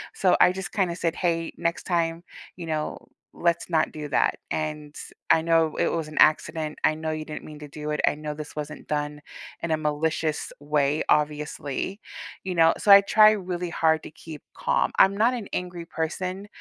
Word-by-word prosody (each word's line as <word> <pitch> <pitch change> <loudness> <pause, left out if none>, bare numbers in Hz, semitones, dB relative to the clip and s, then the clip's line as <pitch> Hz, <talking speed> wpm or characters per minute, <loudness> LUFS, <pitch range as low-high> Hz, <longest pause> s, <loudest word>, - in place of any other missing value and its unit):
so 185 -2 +3
I - - +7
just, 190 -1 -6
kinda 185 -5 0
said, 170 -1 -1
"Hey, 165 -2 -1
next 170 0 -2
time, 170 -1 0 0.3
you 175 - -6
know, 155 -1 -2 0.4
let's 170 0 0
not 165 -2 +1
do 150 -1 -6
that, - - +1
and 150 -1 -3 0.4
I 160 - +5
know 165 -1 +2
it - - +2
was 165 -2 -2
an 155 - -11
accident, 155 0 +2
I 155 - +3
know 160 0 -3
you 155 0 -4
didn't 155 - -7
mean 150 -1 -10
to 150 - -9
do 150 +1 -5
it, 150 - -1
I - - +4
know 150 0 -5
this 150 0 -9
wasn't 150 0 -6
done 150 0 -2 0.4
in 170 - -2
a 160 - +2
malicious 155 0 -1
way, 145 0 +1
obviously." 150 +4 -1 0.4
You 185 -1 -3
know? 165 0 +5
So 205 - +3
I 200 - +12
try 215 +2 +6
really 180 -4 -3
hard 160 -1 +1
to - - -9
keep 155 -2 -10
calm, - - +1
I'm 195 +1 +6
not 230 +4 +3
an 230 -5 -5
angry 175 -2 -4
person, 185 +5 -4
160 Hz, 195 wpm, -25 LUFS, 150-175 Hz, 0.4 s, I